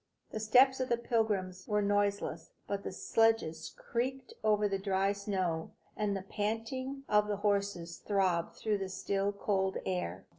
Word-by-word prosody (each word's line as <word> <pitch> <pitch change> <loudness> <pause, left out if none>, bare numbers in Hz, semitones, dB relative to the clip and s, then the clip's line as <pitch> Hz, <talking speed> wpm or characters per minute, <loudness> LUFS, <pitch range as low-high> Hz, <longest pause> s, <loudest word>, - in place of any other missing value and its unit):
The 220 - -3
steps 255 +5 +5
of 255 - -1
the 235 - +3
pilgrims 205 -6 -1
were 210 -1 +2
noiseless; 205 0 0
but 200 -1 -2
the - - -4
sledges 225 -5 +1
creaked 255 +2 -3
over 210 -1 +3
the 195 -1 -1
dry 195 0 +1
snow, 190 -5 -2 0.2
and 205 -2 0
the 190 - -6
panting 225 +7 -3
of 210 0 +4
the 205 -1 -1
horses 200 -4 0
throbbed 185 -4 0
through 210 -2 0
the 190 -1 -3
still, 195 +1 -1
cold 195 -1 0
air. 90 -2 -2
205 Hz, 155 wpm, -32 LUFS, 190-220 Hz, 0.2 s, steps